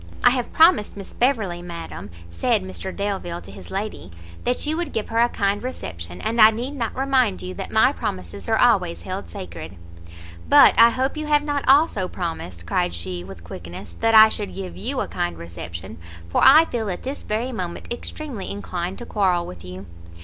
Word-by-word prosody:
"I 245 - +7
have 250 -2 -2
promised 320 - +4
Miss 195 -2 -9
Beverley, 220 -9 0
madam," 165 - -8 0.2
said 225 - +1
Mr 190 0 -6
Delvile 195 -4 -3
to - - -12
his - - -12
lady, 195 - -5 0.4
"that 250 +4 0
you 305 +1 0
would 340 -2 -3
give 220 - -2
her 225 - 0
a 240 +1 +4
kind 200 -1 0
reception; 90 - -6
and 230 +1 +1
I 215 - +10
need 235 +5 -4
not 240 -6 -3
remind 265 - +1
you 90 0 -5
that - - -6
my - - +4
promises 90 +1 -5
are - - +3
always 85 0 +2
held 85 - -5
sacred." 85 0 -8 0.7
"But - - +8
I 230 +1 +8
hope 260 +5 -1
you 305 0 -4
have 295 -1 +3
not 290 -1 -1
also 270 - +4
promised," 160 - -5
cried 85 0 0
she, 90 +1 -5
with 90 -2 -11
quickness, 85 +3 -9
"that 225 0 +3
I 220 0 +10
should 90 - -5
give 90 -3 -6
you 90 - -2
a - - -2
kind 85 -1 -3
reception, 85 0 -8 0.3
for - - +1
I 310 +5 +8
feel 225 -8 -3
at 180 - -4
this 270 +2 -5
very 225 +5 -2
moment 185 0 -4
extremely 245 -4 -6
inclined 185 -2 -4
to 240 - -7
quarrel 185 -6 +1
with 85 -1 -10
you." 90 +2 -8
195 Hz, 195 wpm, -23 LUFS, -, 0.7 s, I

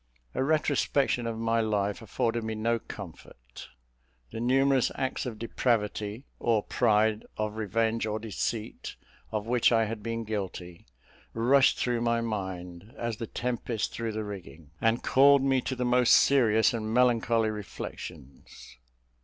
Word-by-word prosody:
A 130 - 0
retrospection 140 -4 +1
of 115 -1 -3
my 115 0 +1
life 105 -1 -1
afforded 115 +1 -1
me 110 0 -3
no 115 +2 0
comfort. 70 - -11 0.6
The - - -6
numerous 135 +2 +3
acts 130 0 -2
of 115 -3 -6
depravity 110 0 -1
or 110 -3 +1
pride, 110 0 +2
of 105 0 -2
revenge 110 +1 0
or 105 0 -1
deceit, 110 +1 -4 0.4
of 110 -1 -2
which 120 +1 +3
I 115 -1 +3
had 110 0 -5
been 115 +1 -3
guilty, 95 - -6 0.5
rushed 130 +4 +4
through 120 -2 0
my 115 0 +1
mind, 95 -1 -5
as 115 -2 -3
the 115 -1 -5
tempest 120 -2 -3
through 115 -1 -3
the 110 0 -3
rigging, 85 -7 -9
and 115 +1 +2
called 140 +1 +5
me 135 -1 +2
to 130 - -3
the 125 0 -2
most 125 0 +4
serious 115 -6 +4
and 110 -2 -3
melancholy 115 -2 +3
reflections. 85 - -9
115 Hz, 145 wpm, -28 LUFS, 105-120 Hz, 0.6 s, called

